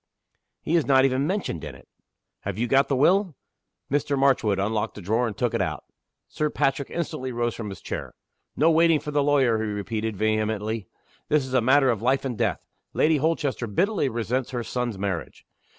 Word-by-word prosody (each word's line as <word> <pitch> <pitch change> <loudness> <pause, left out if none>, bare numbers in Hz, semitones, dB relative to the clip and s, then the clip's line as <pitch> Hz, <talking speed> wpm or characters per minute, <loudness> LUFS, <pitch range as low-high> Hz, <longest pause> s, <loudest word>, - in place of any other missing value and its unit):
"He 165 - 0
is 165 - +2
not 135 -1 +5
even 135 +2 +1
mentioned 185 - -2
in 70 - -7
it." 60 - -17 0.5
"Have - - -5
you 120 - 0
got 135 +3 +3
the 140 - +1
will?" 180 +5 +3 0.6
Mr. 140 0 +1
Marchwood 130 -7 +3
unlocked 105 +3 -1
a - - -7
drawer, 110 +6 +1
and 105 -3 -6
took 120 0 0
it - - 0
out. - - -2 0.4
Sir 150 0 -1
Patrick 135 -1 0
instantly 130 -6 -4
rose 120 -1 -1
from 110 -3 -6
his 95 - -9
chair. - - -6 0.4
"No 160 +3 +4
waiting 165 -1 +4
for 150 - -6
the 145 0 +2
lawyer!" 135 -6 +3
he 110 - -2
repeated, 105 +1 -3
vehemently. 110 -1 -1 0.4
"This 150 -3 +2
is 130 - -8
a 130 - +4
matter 135 +2 +4
of 110 - -3
life 135 +3 +1
and 125 -3 -2
death. - - -1 0.3
Lady 155 0 +3
Holchester 145 -5 -1
bitterly 180 - +1
resents 120 +2 -2
her 120 -2 -3
son's 120 -3 -3
marriage. 95 -4 -4
130 Hz, 195 wpm, -25 LUFS, 110-145 Hz, 0.6 s, not